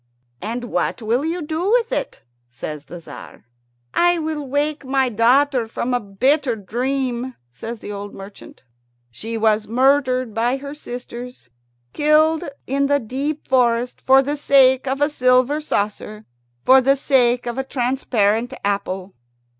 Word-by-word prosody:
"And 230 Hz, +5 st, -4 dB
what 240 Hz, 0 st, -2 dB
will 235 Hz, +5 st, +1 dB
you 330 Hz, +2 st, -2 dB
do 320 Hz, +5 st, -2 dB
with 470 Hz, -1 st, +2 dB
it?" -, -, -3 dB, 0.3 s
says 145 Hz, +3 st, -7 dB
the 175 Hz, -, -9 dB
Tzar. 155 Hz, -3 st, -12 dB, 0.5 s
"I 350 Hz, 0 st, +3 dB
will 310 Hz, -3 st, -3 dB
wake 290 Hz, +2 st, -1 dB
my 265 Hz, -1 st, +1 dB
daughter 245 Hz, +2 st, +3 dB
from 235 Hz, +2 st, -3 dB
a 245 Hz, -, +2 dB
bitter 250 Hz, +6 st, +1 dB
dream," 250 Hz, +3 st, -3 dB, 0.2 s
says 225 Hz, -, -7 dB
the 210 Hz, -, -8 dB
old 205 Hz, 0 st, -6 dB
merchant. 195 Hz, -6 st, -12 dB, 0.5 s
"She 225 Hz, -, -5 dB
was 215 Hz, -1 st, +2 dB
murdered 255 Hz, 0 st, +2 dB
by 240 Hz, +4 st, 0 dB
her 280 Hz, +1 st, -8 dB
sisters 245 Hz, -, -9 dB, 0.4 s
killed 305 Hz, +1 st, +3 dB, 0.2 s
in 275 Hz, +2 st, 0 dB
the 285 Hz, 0 st, +2 dB
deep 275 Hz, +6 st, -4 dB
forest 245 Hz, -1 st, +1 dB
for 265 Hz, +1 st, +5 dB
the 290 Hz, +2 st, -2 dB
sake 265 Hz, -2 st, +4 dB
of 270 Hz, +2 st, -2 dB
a 290 Hz, -, +4 dB
silver 255 Hz, +2 st, +2 dB
saucer, 210 Hz, -4 st, -3 dB, 0.4 s
for 265 Hz, +1 st, +6 dB
the 275 Hz, +2 st, +3 dB
sake 250 Hz, -3 st, +2 dB
of 240 Hz, +2 st, -3 dB
a -, -, 0 dB
transparent 245 Hz, -3 st, 0 dB
apple." 195 Hz, -1 st, -2 dB
255 Hz, 145 wpm, -20 LUFS, 225-280 Hz, 0.5 s, for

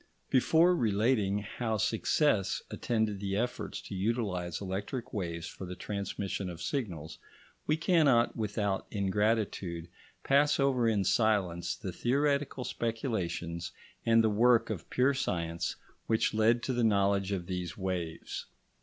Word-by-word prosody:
Before 165 Hz, +7 st, +5 dB
relating 105 Hz, -, +1 dB
how 110 Hz, +1 st, -2 dB
success 110 Hz, 0 st, +1 dB
attended 110 Hz, -4 st, -1 dB
the 100 Hz, -1 st, -2 dB
efforts 120 Hz, +4 st, -2 dB
to -, -, -9 dB
utilise 95 Hz, -4 st, -1 dB
electric 105 Hz, +7 st, -4 dB
waves 85 Hz, -5 st, -3 dB
for 95 Hz, -, -7 dB
the 90 Hz, -, -6 dB
transmission 100 Hz, -1 st, -3 dB
of 85 Hz, -2 st, -8 dB
signals, 85 Hz, -, -4 dB, 0.5 s
we 155 Hz, -, +2 dB
cannot 150 Hz, -9 st, +3 dB
without 105 Hz, -3 st, -1 dB
ingratitude 100 Hz, -4 st, -1 dB, 0.3 s
pass 145 Hz, +2 st, +3 dB
over 130 Hz, -4 st, +3 dB
in 105 Hz, -3 st, +2 dB
silence 95 Hz, -6 st, +1 dB
the 95 Hz, -5 st, -5 dB
theoretical 140 Hz, +2 st, 0 dB
speculations 95 Hz, -9 st, -3 dB, 0.3 s
and 115 Hz, 0 st, +5 dB
the 110 Hz, -, +4 dB
work 115 Hz, +1 st, +4 dB
of 95 Hz, -7 st, -6 dB
pure 130 Hz, +3 st, +3 dB
science 85 Hz, -9 st, -2 dB, 0.3 s
which 110 Hz, -1 st, +2 dB
led 115 Hz, +2 st, +3 dB
to 130 Hz, -, -1 dB
the 120 Hz, -1 st, +1 dB
knowledge 100 Hz, -2 st, +2 dB
of 95 Hz, -3 st, -2 dB
these 90 Hz, -1 st, -4 dB
waves. 90 Hz, -4 st, -4 dB
105 Hz, 130 wpm, -31 LUFS, 95-120 Hz, 0.5 s, Before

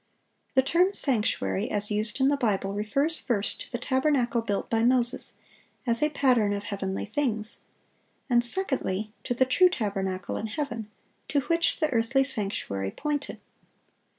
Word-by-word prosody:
The 265 Hz, -, +5 dB
term 355 Hz, +8 st, +2 dB
"sanctuary," 225 Hz, -, +2 dB
as 205 Hz, 0 st, -2 dB
used 210 Hz, +4 st, -1 dB
in 265 Hz, +1 st, +4 dB
the 285 Hz, -, +2 dB
Bible, 200 Hz, -7 st, -1 dB
refers, 275 Hz, +11 st, 0 dB
first, 215 Hz, -5 st, -1 dB
to -, -, -9 dB
the 240 Hz, -, -2 dB
tabernacle 260 Hz, -2 st, +1 dB
built 205 Hz, -3 st, -2 dB
by 225 Hz, -1 st, +1 dB
Moses, 245 Hz, +1 st, +2 dB, 0.5 s
as 235 Hz, -2 st, +3 dB
a 300 Hz, -, +3 dB
pattern 250 Hz, -8 st, +2 dB
of 200 Hz, 0 st, -4 dB
heavenly 195 Hz, -2 st, -3 dB
things; 220 Hz, -2 st, -1 dB, 0.7 s
and, 240 Hz, -2 st, +3 dB
secondly, 240 Hz, -, -1 dB
to 245 Hz, -, -2 dB
the 260 Hz, -, +3 dB
"true 360 Hz, +8 st, +5 dB
tabernacle" 195 Hz, -, -3 dB
in 220 Hz, -, -3 dB
heaven, 230 Hz, -3 st, -4 dB, 0.4 s
to 285 Hz, -, +1 dB
which 335 Hz, +4 st, +1 dB
the 310 Hz, -2 st, +1 dB
earthly 235 Hz, +4 st, +2 dB
sanctuary 195 Hz, -, -2 dB
pointed. 295 Hz, -, -4 dB
235 Hz, 150 wpm, -27 LUFS, 210-275 Hz, 0.7 s, The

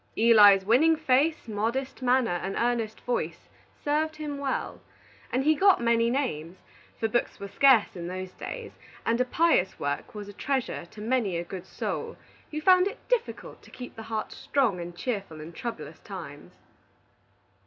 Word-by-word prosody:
Eli's 205 Hz, -4 st, +7 dB
winning 290 Hz, +10 st, +5 dB
face, 310 Hz, 0 st, +2 dB
modest 230 Hz, +6 st, -2 dB
manner, 245 Hz, -7 st, +2 dB
and 195 Hz, -, -3 dB
earnest 230 Hz, -2 st, -1 dB
voice 245 Hz, -, -3 dB, 0.4 s
served 310 Hz, +2 st, 0 dB
him 300 Hz, -2 st, -5 dB
well, 275 Hz, -1 st, -3 dB, 0.5 s
and 260 Hz, +2 st, +1 dB
he 310 Hz, +2 st, +5 dB
got 385 Hz, +5 st, +5 dB
many 235 Hz, 0 st, +2 dB
names; 185 Hz, -, -2 dB, 0.4 s
for 225 Hz, -, +1 dB
books 240 Hz, +2 st, -1 dB
were 200 Hz, -, -6 dB
scarce 255 Hz, 0 st, +4 dB
in 170 Hz, -1 st, -5 dB
those 185 Hz, +1 st, -5 dB
days, 480 Hz, -3 st, -7 dB, 0.3 s
and 230 Hz, +2 st, +2 dB
a -, -, +2 dB
pious 315 Hz, -, +2 dB
work 145 Hz, +11 st, -3 dB
was 205 Hz, -1 st, -6 dB
a 205 Hz, -, -9 dB
treasure 260 Hz, -6 st, -2 dB
to 210 Hz, -, -12 dB
many 220 Hz, -6 st, 0 dB
a 170 Hz, -, -2 dB
good 185 Hz, +1 st, -8 dB
soul -, -, -4 dB, 0.3 s
who 305 Hz, -, -4 dB
found 365 Hz, +3 st, +5 dB
it 425 Hz, +5 st, -8 dB
difficult 485 Hz, -2 st, -2 dB
to -, -, -17 dB
keep 250 Hz, -, -9 dB
the 225 Hz, -, -8 dB
heart 220 Hz, -1 st, -3 dB
strong 245 Hz, -10 st, 0 dB
and 175 Hz, 0 st, -7 dB
cheerful 195 Hz, -7 st, -4 dB
in 160 Hz, +3 st, -9 dB
troublous 235 Hz, +3 st, -6 dB
times. -, -, -9 dB
235 Hz, 165 wpm, -27 LUFS, 200-280 Hz, 0.5 s, Eli's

